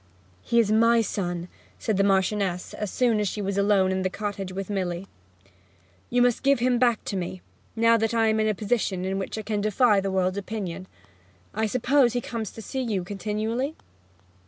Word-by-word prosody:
'He 235 - +2
is 215 -2 +3
my 230 +1 +5
son,' 175 -5 -3 0.3
said 220 - -1
the 195 - +3
Marchioness, 195 -1 0
as 210 - -4
soon 235 -2 +2
as 210 - 0
she 210 - -3
was 200 -1 -2
alone 200 -2 +3
in 190 0 0
the 185 - 0
cottage 200 -1 -4
with 190 0 -5
Milly. 185 -3 -2 1.0
'You 245 0 +3
must 245 -2 +2
give 275 +1 +4
him 245 0 +1
back 240 -3 +2
to - - -3
me, 185 0 -4 0.3
now 230 0 +4
that 225 0 0
I 225 -1 +3
am 220 0 +2
in 215 - +2
a 215 - +1
position 200 -3 -1
in 190 +1 -1
which 195 - -4
I 220 - -4
can 210 -1 -2
defy 215 0 +3
the 195 0 -2
world's 190 0 0
opinion. 190 -3 -5 0.7
I 220 +1 0
suppose 250 +2 +3
he 245 - +1
comes 225 -5 -4
to 225 - -9
see 265 +4 -3
you 210 -7 -1
continually?' 215 - -2
210 Hz, 200 wpm, -25 LUFS, 190-230 Hz, 1.0 s, my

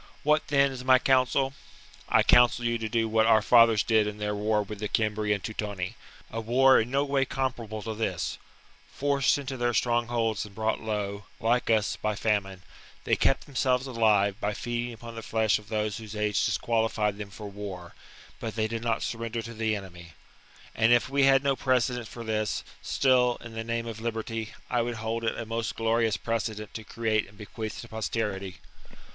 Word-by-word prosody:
What, 150 +1 +2
then, 140 -1 +3
is 130 -1 -7
my 130 0 +6
counsel? 135 +1 +2 0.6
I - - +5
counsel 120 0 +5
you 120 0 0
to 110 -1 -3
do 115 +1 +1
what 110 0 +3
our 110 -2 +5
fathers 115 -2 +6
did 110 -2 +3
in 105 0 -5
their 105 0 -2
war 105 +1 +1
with 105 0 -8
the 105 - -2
Cimbri 105 -1 0
and 100 -2 0
Teutoni, 105 -4 -4 0.2
— - - -23
a 115 - -3
war 130 +4 +5
in 115 - -4
no 140 +2 +1
way 140 -1 +1
comparable 120 -5 -3
to 110 - -4
this: 110 +1 -2 0.5
forced 140 -1 +2
into 135 -2 -5
their 120 -1 0
strong 120 -1 +1
holds 115 -3 0
and 105 -2 -12
brought 110 0 -1
low, 105 -2 -3
like 120 +2 +1
us, 110 -2 +2
by 105 -1 -1
famine, 95 -3 -1 0.4
they - - +2
kept 135 - +1
themselves 130 -2 0
alive 105 -5 +2
by 105 0 -1
feeding 120 0 -3
upon 115 +1 -10
the 115 - -6
flesh 110 -1 +1
of 105 - -17
those 105 -1 -1
whose 110 -1 -8
age 105 -2 +1
disqualified 110 -2 0
them 105 -1 -6
for 105 +2 -9
war; 100 -4 -8 0.5
but 110 - -5
they 110 -1 0
did 115 0 -4
not 115 -1 0
surrender 115 0 -3
to 115 - -8
the 110 -1 0
enemy. 90 -4 -9 0.6
And 115 +1 +3
if 120 +1 +4
we 140 0 +4
had 135 0 +5
no 140 -1 +2
precedent 125 -3 0
for 115 - -8
this, 110 -1 -1 0.2
still, 125 -2 +2
in 120 -1 -10
the 115 0 -4
name 115 0 -2
of 110 -1 -7
liberty, 115 -1 -4
I 120 - +1
would 120 0 -2
hold 115 +1 -3
it 110 - -1
a 115 - -4
most 115 0 -3
glorious 115 -1 +1
precedent 110 -2 -3
to 110 - -6
create 110 0 -1
and 105 - -19
bequeath 110 +1 -6
to 120 - -10
posterity. 105 -4 -3
115 Hz, 200 wpm, -27 LUFS, 105-120 Hz, 0.6 s, my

